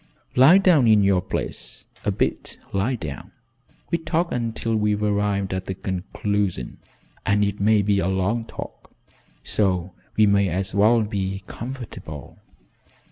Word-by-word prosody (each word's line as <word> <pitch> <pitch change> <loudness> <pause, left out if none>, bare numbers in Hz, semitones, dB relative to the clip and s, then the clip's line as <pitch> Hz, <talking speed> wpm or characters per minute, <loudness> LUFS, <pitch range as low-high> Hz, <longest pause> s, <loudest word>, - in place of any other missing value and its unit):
"Lie 135 +9 +8
down 175 -10 +5
in 105 -2 +5
your 95 -2 +3
place 95 - -6 0.2
a - - 0
bit - - -2 0.2
lie 100 +7 +1
down. 80 - -7 0.6
We'll 170 - 0
talk 165 +2 0
until 115 -1 -2
we've 105 -1 +1
arrived 100 -2 0
at 95 0 -4
a 95 - -2
conclusion, 95 -4 -3 0.4
and 100 +1 +2
it 100 0 -3
may 105 +1 +4
be 100 0 +2
a 90 - 0
long 95 +5 0
talk, - - -9 0.5
so 95 -3 0 0.2
we 110 - +6
may 100 -1 +3
as 95 +3 -2
well 110 +3 +4
be 95 -2 -3
comfortable." 115 - -8
100 Hz, 140 wpm, -23 LUFS, 95-115 Hz, 0.6 s, Lie